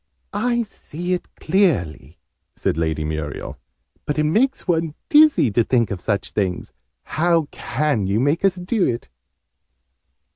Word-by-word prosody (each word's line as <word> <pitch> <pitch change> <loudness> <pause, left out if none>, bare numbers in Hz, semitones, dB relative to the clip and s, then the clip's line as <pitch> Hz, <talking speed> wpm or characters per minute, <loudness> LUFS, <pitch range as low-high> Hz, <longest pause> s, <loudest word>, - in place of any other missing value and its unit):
"I 235 +3 +1
see 175 -4 -5
it 180 - -3
clearly," 120 - 0 0.4
said - - -1
Lady 80 -1 -1
Muriel. 75 -1 -5 0.5
"But 145 - -1
it 150 - +2
makes 225 - +1
one 165 -3 0
dizzy 300 - +6
to 115 +3 +3
think 120 -2 +1
of 95 -3 -4
such 100 0 -2
things! 95 -4 -2 0.3
How 165 -1 +1
can 130 -7 -1
you 100 +3 +1
make 145 +8 +1
us 195 -2 +3
do 185 +3 -1
it?" 120 - -3
150 Hz, 140 wpm, -21 LUFS, -, 0.5 s, dizzy